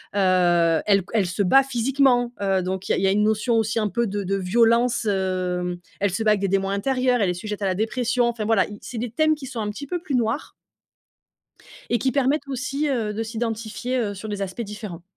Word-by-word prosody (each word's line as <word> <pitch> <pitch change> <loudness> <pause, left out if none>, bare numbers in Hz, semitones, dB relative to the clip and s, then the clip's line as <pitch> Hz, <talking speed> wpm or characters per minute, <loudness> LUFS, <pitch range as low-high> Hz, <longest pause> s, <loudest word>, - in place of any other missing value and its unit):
heu, 175 -4 +3
elle 200 -1 +4
c 185 - -8
elle 215 -4 +2
se 180 +3 -2
bat 270 +9 +5
physiquement, 250 -1 +2
heu, 195 -1 +1
donc 185 +1 -4
il - - +2
y - - +3
a - - -2
il 190 - -1
y - - +4
a - - +3
une 210 +2 +2
notion 220 +2 +1
aussi 220 0 +1
un 215 - +1
peu 235 +3 0
de 205 0 -3
de 195 +1 -1
violence, 230 +5 +2
hem, 185 -3 -1 0.2
elle 200 -1 +1
se 190 +5 -2
bat 215 - +4
avec 210 -2 +1
des 200 - +1
démons 195 0 +1
intérieurs, 250 +4 +1
elle 195 - +2
est - - 0
sujette 210 +4 -6
à - - 0
la 185 -1 0
dépression, 240 +3 0
enfin 235 -2 -2
voilà, 220 -3 +3
i 205 - -9
c'est 240 - -8
des 230 0 -3
thèmes 310 +4 +2
qui 290 - -9
sont 255 -3 -6
un 210 - -2
petit 280 +7 -7
peu 355 +5 -2
plus 290 -5 -2
noirs 240 +4 -1 1.4
et 240 - +2
qui 260 +1 0
permettent 280 +1 +1
aussi, 275 +3 -2
heu, 230 -6 -1
de 220 +2 -3
s'identifier, 225 +2 -3
heu, 210 -4 -1
sur 205 +3 -8
des 205 -1 -3
aspects 195 +4 -4
différents. 205 -5 -7
220 Hz, 245 wpm, -23 LUFS, 195-245 Hz, 1.4 s, bat